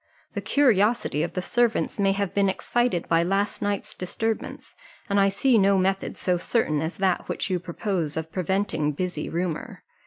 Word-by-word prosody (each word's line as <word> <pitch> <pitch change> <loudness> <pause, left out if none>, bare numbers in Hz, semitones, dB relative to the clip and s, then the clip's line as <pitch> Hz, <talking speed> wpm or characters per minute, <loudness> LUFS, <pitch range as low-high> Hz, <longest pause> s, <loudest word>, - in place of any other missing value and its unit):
The - - -3
curiosity 230 - +2
of 165 - -2
the 185 - -2
servants 235 0 +1
may 195 -1 +3
have 200 -1 -2
been 200 -1 +3
excited 240 -1 0
by 165 0 +3
last 195 +3 0
night's 205 -1 -2
disturbance, 225 +5 -4 0.3
and 200 -2 +2
I 195 0 +5
see 225 +4 +3
no 195 0 +4
method 190 +1 0
so 180 -1 +1
certain 170 -6 0
as 160 +2 -3
that 190 -2 0
which - - -2
you 180 - +1
propose 170 -3 -3
of 160 0 -4
preventing 185 -5 0
busy 180 0 -3
rumour. 170 -1 -4
195 Hz, 175 wpm, -25 LUFS, 175-205 Hz, 0.3 s, I